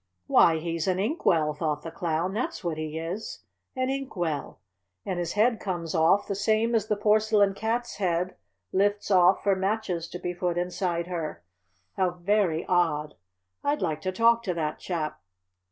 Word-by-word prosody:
"Why, 165 Hz, -, +5 dB
he's 165 Hz, +1 st, -3 dB
an 185 Hz, -1 st, +2 dB
ink 225 Hz, -, -2 dB
well!" 155 Hz, -3 st, +3 dB
thought 150 Hz, -1 st, -2 dB
the 165 Hz, -, -6 dB
Clown. 170 Hz, +1 st, -1 dB
"That's 255 Hz, +5 st, -3 dB
what 165 Hz, -3 st, -2 dB
he 155 Hz, 0 st, -4 dB
is! 170 Hz, +7 st, -5 dB, 0.3 s
An 255 Hz, 0 st, 0 dB
ink 275 Hz, -2 st, -4 dB
well! 160 Hz, -, -3 dB, 0.5 s
And 185 Hz, -2 st, -2 dB
his 170 Hz, -1 st, -2 dB
head 225 Hz, +2 st, +3 dB
comes 175 Hz, -4 st, -3 dB
off 165 Hz, +4 st, +4 dB
the -, -, -1 dB
same 220 Hz, +3 st, +1 dB
as 220 Hz, -2 st, +1 dB
the 210 Hz, -, +1 dB
Porcelain 210 Hz, -1 st, +3 dB
Cat's 230 Hz, +4 st, -2 dB
head 180 Hz, -2 st, 0 dB, 0.4 s
lifts 205 Hz, +2 st, +1 dB
off 185 Hz, 0 st, +5 dB
for 200 Hz, -1 st, +3 dB
matches 190 Hz, -3 st, -1 dB
to -, -, -6 dB
be 180 Hz, 0 st, -4 dB
put 175 Hz, -1 st, -1 dB
inside 175 Hz, -1 st, -1 dB
her. 165 Hz, -, -5 dB, 0.5 s
How 185 Hz, -1 st, +3 dB
very 180 Hz, -2 st, +1 dB
odd! 155 Hz, -4 st, +1 dB, 0.5 s
I'd 290 Hz, -4 st, 0 dB
like 155 Hz, -3 st, -1 dB
to 185 Hz, -, -1 dB
talk 230 Hz, +4 st, +4 dB
to 180 Hz, -3 st, -1 dB
that 155 Hz, -2 st, -2 dB
chap." 160 Hz, -4 st, -3 dB
180 Hz, 175 wpm, -27 LUFS, 165-210 Hz, 0.5 s, Why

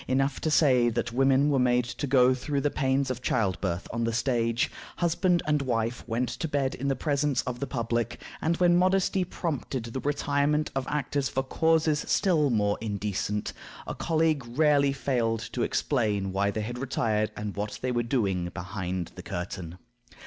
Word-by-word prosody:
Enough 135 Hz, +1 st, 0 dB
to 155 Hz, -, 0 dB
say 130 Hz, -6 st, +4 dB
that 120 Hz, +1 st, -2 dB
women 135 Hz, +3 st, +3 dB
were 135 Hz, -, +2 dB
made 125 Hz, -1 st, +3 dB
to 145 Hz, +4 st, -4 dB
go 130 Hz, -1 st, +5 dB
through 140 Hz, +2 st, -2 dB
the 145 Hz, -, +1 dB
pains 135 Hz, -1 st, +1 dB
of 125 Hz, 0 st, -5 dB
childbirth 95 Hz, -6 st, -1 dB
on 115 Hz, 0 st, -1 dB
the 115 Hz, -, +1 dB
stage; 115 Hz, -1 st, 0 dB, 0.2 s
husband 175 Hz, 0 st, +1 dB
and 150 Hz, -1 st, +2 dB
wife 115 Hz, -2 st, -1 dB
went 120 Hz, +2 st, 0 dB
to 160 Hz, +7 st, -3 dB
bed 140 Hz, -3 st, 0 dB
in 140 Hz, +2 st, -2 dB
presence 145 Hz, -1 st, 0 dB
of 125 Hz, -1 st, -4 dB
the 140 Hz, -, -3 dB
public; 120 Hz, -2 st, -2 dB, 0.2 s
and 165 Hz, +1 st, +1 dB
when 175 Hz, -1 st, +4 dB
modesty 185 Hz, +1 st, +2 dB
prompted 145 Hz, -8 st, -3 dB
the 115 Hz, +3 st, -5 dB
retirement 145 Hz, +1 st, 0 dB
of 135 Hz, -1 st, -2 dB
actors 140 Hz, -2 st, -1 dB
for 135 Hz, -, -1 dB
causes 160 Hz, +1 st, +2 dB
still 160 Hz, -7 st, +3 dB
more 105 Hz, -3 st, +1 dB
indecent, 105 Hz, -1 st, -2 dB, 0.3 s
a -, -, -4 dB
colleague 160 Hz, -3 st, +1 dB
rarely 145 Hz, -3 st, +4 dB
failed 120 Hz, -5 st, 0 dB
to 120 Hz, +2 st, -4 dB
explain 105 Hz, -10 st, 0 dB
why 100 Hz, +1 st, +1 dB
they 110 Hz, +2 st, -2 dB
had 120 Hz, +3 st, -5 dB
retired 110 Hz, -5 st, 0 dB
and 105 Hz, -1 st, -4 dB
what 105 Hz, +1 st, -3 dB
they 130 Hz, -, 0 dB
were 120 Hz, -1 st, +1 dB
doing 100 Hz, -8 st, 0 dB
behind 90 Hz, -2 st, -4 dB
the -, -, -9 dB
curtain. 90 Hz, -1 st, -5 dB
130 Hz, 175 wpm, -27 LUFS, 115-145 Hz, 0.3 s, go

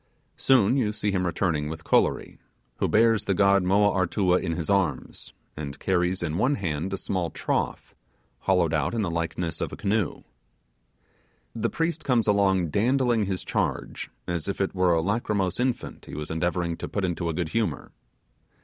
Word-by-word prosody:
Soon 130 Hz, -1 st, +4 dB
you 110 Hz, -6 st, +1 dB
see 105 Hz, -1 st, -1 dB
him 90 Hz, -2 st, 0 dB
returning 80 Hz, -4 st, 0 dB
with 80 Hz, 0 st, -7 dB
Kolory, -, -, +1 dB, 0.4 s
who -, -, +1 dB
bears 115 Hz, 0 st, +3 dB
the 100 Hz, -, +1 dB
god 100 Hz, +1 st, +4 dB
Moa 100 Hz, +3 st, +3 dB
Artua 95 Hz, 0 st, +2 dB
in 80 Hz, -, -2 dB
his 80 Hz, -1 st, -3 dB
arms, 95 Hz, -9 st, -1 dB, 0.2 s
and 75 Hz, -2 st, -6 dB
carries 90 Hz, 0 st, 0 dB
in 80 Hz, +3 st, -2 dB
one 140 Hz, +3 st, +2 dB
hand 85 Hz, -, -3 dB
a 95 Hz, -, -2 dB
small 90 Hz, -3 st, -2 dB
trough, -, -, -2 dB, 0.5 s
hollowed 90 Hz, -4 st, +2 dB
out 80 Hz, +8 st, 0 dB
in 110 Hz, -, 0 dB
the 85 Hz, -, -1 dB
likeness 85 Hz, 0 st, -2 dB
of -, -, -2 dB
a -, -, -6 dB
canoe. 100 Hz, -4 st, -1 dB, 1.3 s
The -, -, -1 dB
priest 165 Hz, -1 st, -2 dB
comes 120 Hz, -5 st, +2 dB
along 95 Hz, -5 st, +2 dB
dandling 120 Hz, -, +2 dB
his 95 Hz, -2 st, -3 dB
charge -, -, -2 dB, 0.2 s
as 85 Hz, -2 st, -3 dB
if 100 Hz, -, -3 dB
it 95 Hz, -, 0 dB
were 90 Hz, -2 st, +2 dB
a 80 Hz, -, +2 dB
lachrymose 100 Hz, -2 st, -1 dB
infant 125 Hz, -1 st, -2 dB
he -, -, -9 dB
was 75 Hz, +1 st, -5 dB
endeavouring 85 Hz, 0 st, -1 dB
to -, -, -5 dB
put 100 Hz, -2 st, -1 dB
into 85 Hz, -1 st, -2 dB
a -, -, -1 dB
good 85 Hz, -1 st, -2 dB
humour. 115 Hz, +4 st, -2 dB
95 Hz, 175 wpm, -26 LUFS, 85-105 Hz, 1.3 s, Soon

